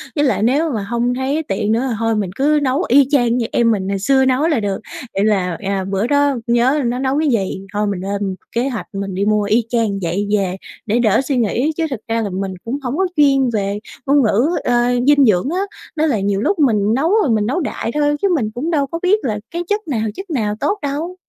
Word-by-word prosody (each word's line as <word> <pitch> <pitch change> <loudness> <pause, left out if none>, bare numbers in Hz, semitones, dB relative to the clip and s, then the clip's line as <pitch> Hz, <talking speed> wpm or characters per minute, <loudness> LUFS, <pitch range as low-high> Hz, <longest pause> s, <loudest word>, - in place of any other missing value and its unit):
Với 290 - +2
lại 255 -5 +1
nếu 290 +7 +2
mà 215 -5 -2
hông 235 +3 -1
thấy 270 +5 -1
tiện 210 -3 -1
nữa 230 +4 +1
thì 235 - -1
thôi 225 0 +1
mình 205 -3 -1
cứ 295 +2 +2
nấu 270 +5 +1
y 275 +1 +5
chang 245 -4 +3
như 235 - 0
em 230 -1 +3
mình 195 -3 -1
ngày 195 -1 -1
xưa 265 +6 +3
nấu 260 +4 +2
là 310 -7 +1
được, 200 -2 -2 0.3
vậy 195 - 0
là, 185 -5 +1
à, 195 -1 -2
bữa 195 +3 0
đó 285 -1 +2
nhớ 245 +5 +2
nó 245 +2 -1
nấu 270 +2 0
cái 310 -1 +1
gì 195 -5 -1
thôi 210 0 0
mình 195 -3 -2
lên 200 0 -3 0.2
kế 245 +4 +1
hoạch 235 -5 -5
mình 195 -1 -4
đi 195 +2 0
mua 210 0 +2
y 215 +4 +2
chang 225 -5 0
vậy 185 +4 -1
về 185 -2 -1 0.3
để 225 +3 +1
đỡ 220 0 +3
suy 270 -1 -1
nghĩ. 245 +6 +1
Chứ 330 - 0
thực 260 -6 -4
ra 230 0 0
là 210 - -2
mình 190 +1 -3
cũng 240 +5 -2
hổng 255 +3 -2
có 380 0 +2
chuyên 275 -3 +4
về 200 -1 -1 0.3
ngôn 280 +1 +4
ngữ, 230 +8 +2
ờ, 245 - +1 0.3
dinh 285 -1 +6
dưỡng 210 +3 +2
á, 360 - -1 0.4
nên 310 +1 +2
là 230 -7 +1
nhiều 200 0 0
lúc 390 - 0
mình 215 -7 +2
nấu 295 +6 +1
rồi 295 - +1
mình 215 -2 +1
nấu 265 +10 0
đại 280 -7 -3
thôi 295 0 +1
chứ 400 - +3
mình 220 -8 -1
cũng 300 +8 -2
đâu 285 -4 +1
có 330 +4 -5
biết 395 +4 +3
là 215 -4 -2
cái 345 +1 -3
chất 415 -2 -1
nào, 245 -7 -1
chất 385 0 -8
nào 215 -9 -1
tốt 400 - 0
đâu. 300 +6 -3
240 Hz, 255 wpm, -18 LUFS, 205-285 Hz, 0.4 s, dinh